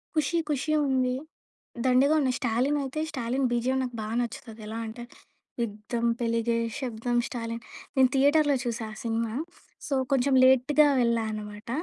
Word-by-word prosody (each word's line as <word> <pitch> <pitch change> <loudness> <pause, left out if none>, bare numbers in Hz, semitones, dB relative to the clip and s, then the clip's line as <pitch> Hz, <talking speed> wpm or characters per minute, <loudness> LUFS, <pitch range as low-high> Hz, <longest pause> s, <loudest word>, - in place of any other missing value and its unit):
'ఖుషీ 310 +3 +1
ఖుషీ' 300 +2 0
ఉంది. 255 -1 +1 0.7
దండిగా 260 +4 +4
ఉన్నాయి 260 -3 +1
'స్టాలిన్' 255 +5 +1
అయితే 270 +3 -4
'స్టాలిన్' 260 -1 -1
బిజిఎమ్ 255 +2 +1
నాకు 245 -2 -5
బా 215 - -4
నచ్చుతది. 230 -1 -5
ఎలా 220 +1 -5
అంటే, 225 +2 -7 0.6
యుద్ధం 230 +2 -3
పెలిగే 230 0 0 0.2
శబ్దం 240 -1 -2
స్టాలిన్ 230 -1 -5 0.3
నేను 260 -1 +5
థియేటర్‌లో 285 +1 +4
చూసా 235 -2 -3
ఆ - - -11
సినిమా. 230 -1 -1 0.5
సో, - - -2 0.2
కొంచెం 270 +1 +2
లేట్‌గా 265 +4 +5
వెళ్ళా 235 -1 +2
అన్నమాట. 210 0 -7
245 Hz, 140 wpm, -27 LUFS, 230-270 Hz, 0.7 s, నేను